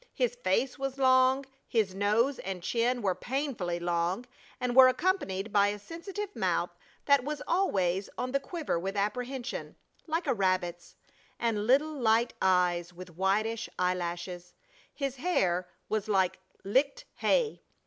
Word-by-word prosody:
His - - +1
face 270 - 0
was 270 0 -3
long, 260 0 +4 0.2
his 215 -5 +1
nose 215 +7 +1
and 185 -2 -5
chin 240 +4 0
were 190 -2 +2
painfully 225 -5 -2
long, 175 +5 -1 0.3
and 250 -1 -1
were 260 -1 +10
accompanied 255 - 0
by 200 -1 +5
a 205 +1 -2
sensitive 385 - -7
mouth - - 0 0.3
that 280 -3 +5
was 295 +1 -4
always 195 - +1
on 255 - -2
the 275 - +2
quiver 300 - -3
with 195 +3 -4
apprehension, 245 +5 -3 0.3
like 325 +2 -1
a 270 - +2
rabbit's, 185 -4 -1 0.4
and 220 -3 0
little 290 +5 +4
light 235 -3 +2
eyes 180 -2 +2
with 180 -1 -11
whitish 215 +5 0
eyelashes. 175 0 -2 0.4
His 275 -2 -3
hair 185 - +1 0.2
was 215 0 -1
like 190 -3 +2 0.2
licked 275 - +1
hay. 485 -3 +1
225 Hz, 140 wpm, -30 LUFS, 185-275 Hz, 0.4 s, were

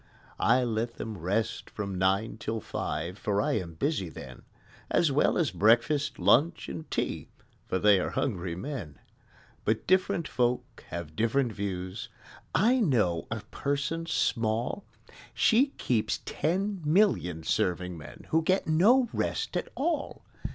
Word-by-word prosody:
I 125 0 +4
let 115 0 -2
them 110 -1 -5
rest 110 +7 -1
from 100 -2 -4
nine 95 +4 +1
till 110 +1 -3
five. 85 -2 -4
For 100 -1 0
I - - +1
am 85 -3 -7
busy 100 - -1
then, - - -10 0.5
As 165 -4 +3
well 140 - +3
as 155 -10 +1
breakfast, 115 - +3
lunch, 160 +7 +3
and 160 - -7
tea, - - -2 0.4
For 95 - 0
they 100 0 +5
are - - -1
hungry 95 -9 -2
men: 90 - -6 0.7
But 110 +1 0
different 185 -4 +2
folk 125 -1 -1
have 85 -3 -6
different 115 - +1
views: 95 -1 -4 0.5
I 245 +6 +4
know 110 - +1
a 110 -1 -3
person 145 +4 -2
small 115 - 0 0.5
She 250 +5 +4
keeps 115 -4 0
ten 190 +4 -1
million 150 - +2
serving 90 +2 0
men, 80 - -11
Who 160 - +4
get 185 +4 +1
no 220 +11 +4
rest - - -2
at - - -1
all! 310 +1 -2
115 Hz, 140 wpm, -29 LUFS, 95-160 Hz, 0.7 s, they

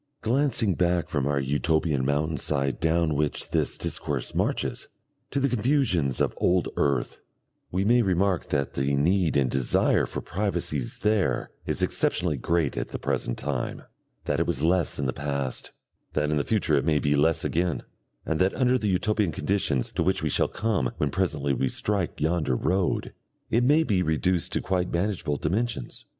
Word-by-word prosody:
Glancing 120 -4 +2
back 90 -1 +1
from 70 -3 -1
our 70 -1 +1
Utopian 75 +1 +1
mountain 75 +3 0
side 70 0 -1
down 80 -1 +2
which 75 0 -1
this - - +1
discourse - - -2
marches, - - -1 0.4
to 140 - -1
the 140 - +2
confusions 115 - +1
of - - +1
old 90 0 +2
earth, 70 -3 0 0.5
we 95 +2 0
may 120 +3 +5
remark 95 -2 +1
that 70 -1 -1
the 70 +1 0
need 85 +4 +2
and 65 -3 +2
desire 65 -2 +2
for - - -5
privacies 85 - -2
there 105 -2 +1 0.2
is - - -1
exceptionally 85 -4 0
great 80 +2 0
at - - -2
the - - -5
present - - -2
time, 70 -3 -3 0.4
that - - 0
it - - +1
was 70 - -1
less 85 0 +2
in 70 - -2
the 65 - -1
past, 70 -3 -3 0.4
that 75 0 0
in 75 - +1
the 70 - +1
future 105 -6 0
it 70 - +2
may 80 0 +2
be 75 0 +1
less 80 +3 +2
again, 85 +1 0 0.4
and 80 - -1
that 95 +1 +2
under 130 0 +2
the 105 - -1
Utopian 105 0 +1
conditions 75 -5 0
to - - -2
which 95 +3 +1
we - - +1
shall - - +2
come 105 - -1
when 75 -2 0
presently 75 -7 0
we 65 0 0
strike 100 -4 -1
yonder 80 -4 +1
road, 90 +7 0 0.4
it 120 +2 +3
may 150 +5 +4
be 100 -10 +1
reduced 90 +2 0
to - - +1
quite 90 -2 -1
manageable 85 -4 -1
dimensions. 95 - -2
85 Hz, 175 wpm, -26 LUFS, 70-95 Hz, 0.5 s, may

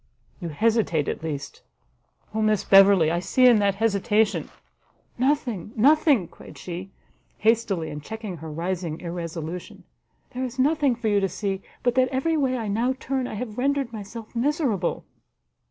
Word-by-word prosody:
You 175 -3 -5
hesitate 205 -4 +1
at - - -3
least, 145 -3 -5 0.7
O 220 - -1
Miss 215 -1 +2
Beverley! 195 -4 +6
I 170 - 0
see 255 +8 +2
in 240 -4 +7
that 200 -1 +2
hesitation 210 0 +1 0.4
" - - -39
"Nothing, 240 - -2
nothing!" 275 - +4
cried - - -14
she, 180 +2 -7 0.5
hastily, 215 -7 +1
and 150 0 -6
checking 215 0 -6
her 160 0 -8
rising 170 0 -3
irresolution; 170 0 -6 0.5
"there 255 +1 -4
is 255 0 -5
nothing 285 -1 +2
for 235 -1 -3
you 205 -1 +3
to 195 -1 0
see, 195 +1 -3 0.2
but 245 - +2
that 255 0 +3
every 270 +6 0
way 265 -4 +1
I 225 -3 -4
now 230 +6 +1
turn 265 -2 -2
I - - -6
have 220 0 -5
rendered 275 -2 0
myself 220 +2 -8
miserable!" 245 - 0
215 Hz, 160 wpm, -24 LUFS, 180-250 Hz, 0.7 s, in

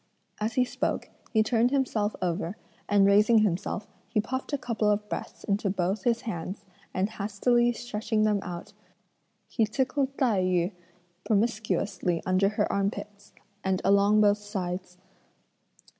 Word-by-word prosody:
As 215 +1 -1
he 250 +1 +3
spoke, - - -2 0.2
he 220 -2 +4
turned 230 +2 +2
himself 235 -6 0
over, 180 +2 -2 0.3
and 200 -1 +5
raising 210 +3 +5
himself, 195 +1 -1 0.2
he 220 -1 +1
puffed 260 +7 -3
a 285 - +1
couple 230 -5 0
of 210 0 0
breaths - - -6
into 200 0 0
both 190 +1 -1
his 235 -1 +2
hands, 200 -2 -5 0.3
and 185 +2 0
hastily 225 +3 +1
stretching 220 -2 -1
them 210 -1 +2
out, 175 -2 -7 0.7
he 225 - 0
tickled 270 +4 -1
Tai 225 -8 +2
yü 180 0 +1 0.5
promiscuously 205 -5 0
under 185 +2 +3
her 210 0 0
armpits, 200 +1 -3 0.3
and 190 -1 +1
along 200 +2 +5
both 205 0 +4
sides. 185 -3 -5
210 Hz, 140 wpm, -28 LUFS, 195-225 Hz, 0.7 s, and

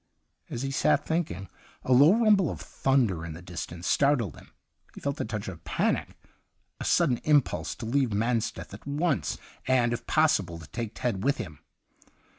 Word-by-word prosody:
As 120 - -4
he 135 - -2
sat 135 - +2
thinking, 145 - -2 0.4
a 130 - +2
low 145 +10 +7
rumble 210 -6 +4
of - - -5
thunder 120 -11 +1
in 85 -1 -6
the 80 - -9
dis 85 -2 -5
tance 85 +1 -9
startled 140 - +2
him. - - -15 0.5
He - - -8
felt 140 +1 -2
a - - -1
touch 105 -2 -4
of 85 -4 -8
panic 80 - -1 0.3
— - - -47
a - - -3
sudden 150 -9 +3
impulse 145 -1 +1
to - - -7
leave 130 +1 +1
Mansteth 115 0 -1
at 100 - -11
once 145 - 0 0.3
and, 125 -2 +3
if 120 - -5
possible, 100 - +2
to 80 - -10
take 115 - -5
Ted 115 -7 -2
with 140 +2 +2
him. 80 - -7
120 Hz, 185 wpm, -28 LUFS, 95-140 Hz, 0.5 s, low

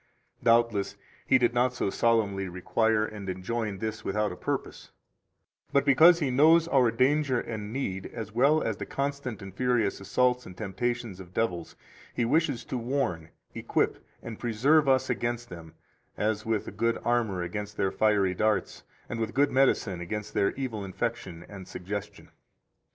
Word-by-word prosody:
Doubtless 115 -4 +2 0.3
He - - +6
did 120 -2 +2
not 125 +1 +2
so 100 - -1
solemnly 100 -5 +1
require 110 +5 +1
and 105 -3 -7
enjoin 100 +3 -3
this 110 +1 -4
without 105 +1 0
a - - -6
purpose; - - -4 0.8
but 140 0 +3
because 160 +5 +7
He 145 -6 -1
knows 160 +5 +5
our 130 -6 +4
danger 130 +2 +2
and 110 -3 -5
need, 100 -7 -3
as 110 -3 -7
well 140 +7 +3
as - - -2
the - - -5
constant 140 -6 -3
and 95 -1 -9
furious 120 -5 0
assaults 125 +5 +1
and 90 - -11
temptations 110 0 -3
of 90 -1 -12
devils, 90 -7 -2 0.4
He 120 - +1
wishes 145 -1 +1
to 130 - -3
warn, 115 - -2 0.2
equip, - - -1 0.2
and 115 -2 -7
preserve 135 +6 +3
us 130 -1 +3
against 120 0 -2
them, 85 -3 -11 0.4
as 110 +1 -1
with 110 -2 -1
a - - -5
good 115 +3 0
armor 115 -7 +1
against 105 +4 -5
their 95 - +1
fiery 100 -2 +2
darts 105 +2 0 0.3
and 115 - -5
with 110 +1 -3
good 140 +2 +3
medicine 115 -9 +2
against 105 +4 -5
their 100 - +2
evil 120 -7 -4
infection 95 -4 -4
and 95 -3 -10
suggestion. 100 +2 -7
110 Hz, 160 wpm, -28 LUFS, 100-125 Hz, 0.8 s, because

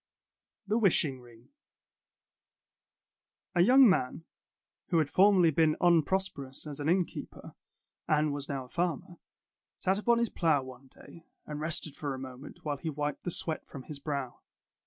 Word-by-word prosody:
THE 215 +3 +1
WISHING 155 - +2
RING 120 -2 -18 2.0
A 175 - +3
young 255 +7 +7
man, 165 - +1 0.6
who 175 - +1
had 155 -3 +1
formerly 185 -4 +5
been 155 0 +3
unprosperous 170 -5 +1
as 150 -2 -7
an 145 +2 -1
innkeeper, 180 0 -2 0.5
and 150 -1 +2
was 145 0 -5
now 135 -2 -3
a - - -18
farmer, 175 +1 -3 0.6
sat 190 +2 0
upon 235 +2 +3
his 235 -1 +1
plow 160 -6 +1
one 130 +1 -12
day, 165 +5 -15 0.2
and 150 0 -6
rested 155 -2 -2
for 145 -3 -4
a - - -8
moment, 130 +3 -10
while 145 -1 -2
he 160 - -4
wiped 145 -1 -4
the - - -1
sweat 165 -2 -2
from 135 - -9
his 150 0 -8
brow. 140 -4 -4
155 Hz, 155 wpm, -30 LUFS, 140-175 Hz, 2.0 s, young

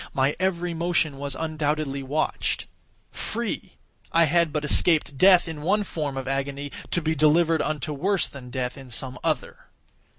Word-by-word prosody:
My 135 +2 +2
every 175 -2 0
motion 165 -4 0
was 140 -1 -3
undoubtedly 150 -3 -1
watched. 145 +4 -1 0.5
Free!—I 165 - -2
had 165 +1 +3
but 150 0 -2
escaped 155 -1 +2
death 185 +4 +6
in 160 -2 -6
one 205 +7 +2
form 150 -7 -4
of 135 0 -4
agony, 140 +1 -2 0.2
to 170 - 0
be 160 +1 +1
delivered 160 +1 +4
unto 150 -1 -2
worse 190 +5 +1
than 130 -3 -10
death 125 +1 -3
in 135 -1 -11
some 125 +2 -4
other. - - -2
150 Hz, 155 wpm, -25 LUFS, 140-170 Hz, 0.5 s, death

